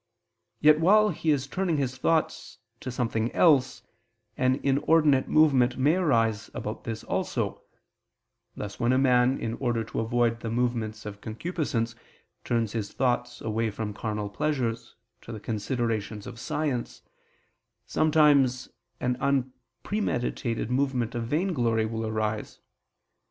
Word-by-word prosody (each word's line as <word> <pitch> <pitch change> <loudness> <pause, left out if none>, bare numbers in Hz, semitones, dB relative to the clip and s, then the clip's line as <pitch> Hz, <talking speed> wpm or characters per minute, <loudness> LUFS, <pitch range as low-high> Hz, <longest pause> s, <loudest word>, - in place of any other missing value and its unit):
Yet 150 0 +6
while 210 +6 +5
he 160 - -2
is 145 -3 +2
turning 175 +2 -1
his 130 -3 -1
thoughts 160 +5 -1 0.2
to 130 - -6
something 115 -2 -1
else, 130 -7 +3 0.5
an 130 +1 +2
inordinate 145 0 +3
movement 135 -5 +4
may 140 +4 +3
arise 115 - +1
about 110 - -5
this 110 -1 -5
also: - - -2 0.9
thus 105 0 -7
when 120 +1 +2
a - - +3
man, 130 -1 +3
in 115 0 -3
order 120 -3 0
to 110 - -5
avoid 115 0 +1
the 115 - -5
movements 115 -2 -2
of 100 -1 -8
concupiscence, 115 -2 -2 0.5
turns 115 -3 0
his 110 -3 -3
thoughts 120 -1 -1
away 110 +1 -1
from 105 0 -4
carnal 105 -1 -3
pleasures, 125 -3 -2 0.3
to - - -10
the 110 - -6
considerations 110 -1 -3
of 120 -2 -9
science, 135 -3 -3 0.8
sometimes 145 -5 +3 0.3
an 125 0 -1
unpremeditated 130 - -2
movement 125 -3 0
of 115 -1 -3
vainglory 125 - +1
will 110 0 -3
arise. 110 -1 -3
125 Hz, 130 wpm, -27 LUFS, 115-140 Hz, 0.9 s, Yet